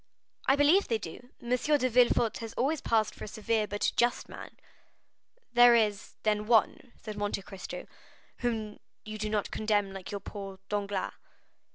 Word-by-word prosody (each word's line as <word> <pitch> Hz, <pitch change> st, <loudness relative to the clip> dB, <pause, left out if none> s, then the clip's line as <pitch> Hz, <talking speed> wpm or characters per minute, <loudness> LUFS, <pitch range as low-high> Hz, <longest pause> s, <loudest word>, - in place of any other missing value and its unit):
"I 270 Hz, -, +6 dB
believe 300 Hz, +8 st, +4 dB
they 230 Hz, -, +1 dB
do. 220 Hz, +5 st, -9 dB
M. 240 Hz, -, -7 dB
de 255 Hz, +2 st, +2 dB
Villefort 240 Hz, -1 st, +3 dB
has 225 Hz, -1 st, -6 dB
always 290 Hz, +5 st, 0 dB
passed 220 Hz, -2 st, +1 dB
for -, -, -8 dB
a -, -, -9 dB
severe 215 Hz, 0 st, -1 dB
but 205 Hz, 0 st, -2 dB
a -, -, 0 dB
just 240 Hz, 0 st, +1 dB
man." -, -, -10 dB, 1.0 s
"There 240 Hz, 0 st, +8 dB
is, 210 Hz, -3 st, 0 dB
then, 210 Hz, -1 st, +1 dB
one," 235 Hz, +2 st, +2 dB
said 215 Hz, -1 st, -8 dB
Monte 205 Hz, -1 st, -2 dB
Cristo, 195 Hz, -1 st, -8 dB, 0.5 s
"whom 220 Hz, -3 st, -2 dB, 0.3 s
you 215 Hz, 0 st, -6 dB
do 215 Hz, 0 st, -2 dB
not 210 Hz, -1 st, -1 dB
condemn 205 Hz, -2 st, 0 dB
like 190 Hz, -2 st, -8 dB, 0.2 s
poor 195 Hz, -2 st, -7 dB
Danglars?" 205 Hz, -2 st, -2 dB
215 Hz, 165 wpm, -30 LUFS, 205-240 Hz, 1.0 s, There